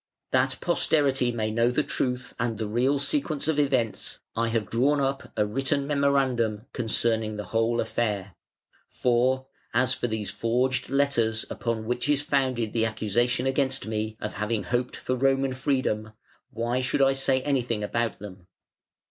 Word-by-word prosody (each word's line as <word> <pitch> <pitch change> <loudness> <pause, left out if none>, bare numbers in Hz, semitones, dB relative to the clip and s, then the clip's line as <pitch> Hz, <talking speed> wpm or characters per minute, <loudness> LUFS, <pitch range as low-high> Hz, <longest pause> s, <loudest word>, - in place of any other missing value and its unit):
That 130 +1 +2
posterity 140 -7 +2
may 110 -2 -1
know 115 +2 +3
the 125 +5 +1
truth 125 -2 -2
and 115 -2 -1
the 110 - -2
real 125 +7 +1
sequence 155 - 0
of 155 -2 +1
events, 130 -6 0 0.2
I 115 0 +1
have 115 -3 -1
drawn 140 +5 +2
up 135 0 -2
a 105 - +3
written 135 +5 -1
memorandum 135 -6 +1
concerning 110 -2 0
the 105 - -3
whole 115 +1 +2
affair. 100 -5 -1 0.6
For, 130 +2 +1 0.3
as 125 +1 +4
for - - -2
these 110 -3 -3
forged 120 +5 0
letters 125 -5 +1
upon 115 -2 -2
which 125 +4 -1
is 145 -1 +2
founded 130 -6 0
the 115 -1 +2
accusation 120 +4 0
against 135 0 0
me 110 0 -3
of 105 - -4
having 105 +1 -1
hoped 125 +1 -1
for 130 - -2
Roman 135 0 +2
freedom, 130 -5 -1 0.4
why 120 +2 -1
should 130 +2 +2
I 135 0 +4
say 135 -1 +1
anything 120 -6 0
about 115 +1 -1
them? 95 -3 -11
120 Hz, 155 wpm, -26 LUFS, 110-135 Hz, 0.6 s, as